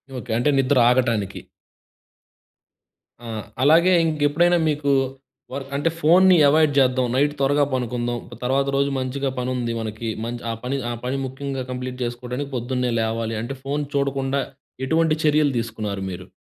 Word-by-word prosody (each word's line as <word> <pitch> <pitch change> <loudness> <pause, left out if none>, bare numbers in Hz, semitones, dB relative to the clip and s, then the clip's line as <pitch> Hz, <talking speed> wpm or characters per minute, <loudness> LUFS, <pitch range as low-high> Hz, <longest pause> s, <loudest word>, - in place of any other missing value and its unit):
Okay. 125 -2 -6
అంటే 125 +5 +2
నిద్ర 135 +1 +2
ఆగటానికి. 120 -6 +1 1.9
ఆ! - - -7 0.4
అలాగే 170 +6 +5
ఇంకెప్పుడైనా 160 +3 +2
మీకు, 145 -1 0 0.6
వర్క్ 135 0 -5
అంటే 145 +4 +1
ఫోన్‌ని 180 +3 +6
అవాయిడ్ 155 0 +4
చేద్దాం, 130 -1 +2
నైట్ 145 +2 +2
త్వరగా 145 +1 +3
పడుకుందాం, 120 -1 -2
ప్ - - -8
తర్వాత 135 +2 +1
రోజు 140 0 +2
మంచిగా 135 +1 -2
పని 125 0 -2
ఉంది 120 -2 -2
మనకి, 110 +1 -4 0.2
మంచి 120 0 -5
ఆ - - -2
పని 130 +3 -2
ఆ - - -2
పని 130 +2 -1
ముఖ్యంగా 135 0 -4
కంప్లీట్ 125 0 -5
చేసుకోవడానికి, 125 +3 -4
పొద్దున్నే 125 0 -1
లేవాలి. 115 0 -2
అంటే, 135 +3 -5
ఫోన్ 145 +2 -2
చూడకుండా 140 0 0 0.4
ఎటువంటి 160 +2 +2
చర్యలు 150 -2 +3
తీసుకున్నారు 110 -4 -4
మీరు? 90 +1 -8
130 Hz, 145 wpm, -22 LUFS, 120-145 Hz, 1.9 s, ఫోన్‌ని